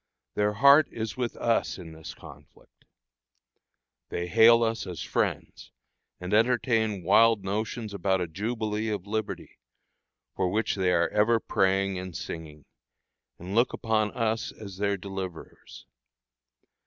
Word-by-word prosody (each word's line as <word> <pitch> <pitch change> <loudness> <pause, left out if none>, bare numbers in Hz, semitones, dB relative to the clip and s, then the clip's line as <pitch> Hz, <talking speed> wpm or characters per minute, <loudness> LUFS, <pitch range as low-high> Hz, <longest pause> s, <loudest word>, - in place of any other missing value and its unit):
Their 105 0 +1
heart 140 +7 +6
is 110 -1 -5
with 125 -2 -3
us 115 -1 0
in 85 -4 -10
this 80 0 -10
conflict. - - -17 1.2
They 85 - -3
hail 115 +5 +6
us 115 0 -2
as 90 -3 -6
friends, - - -3 0.5
and 90 +3 -5
entertain 110 -3 +2
wild 110 +3 +4
notions 105 +2 -3
about 95 0 0
a 90 - -1
jubilee 110 +4 -3
of 100 -3 -3
liberty, 110 0 -5 0.8
for 95 -1 0
which 110 +4 0
they 95 -2 +1
are 85 -1 +2
ever 110 +2 +2
praying 95 -2 0
and 90 -2 -6
singing, 75 -3 -8 0.7
and 90 +3 -8
look 120 +3 +2
upon 110 -2 0
us 115 -1 -1
as 100 -3 -10
their 100 0 0
deliverers. 95 -3 -8
105 Hz, 130 wpm, -27 LUFS, 95-115 Hz, 1.2 s, heart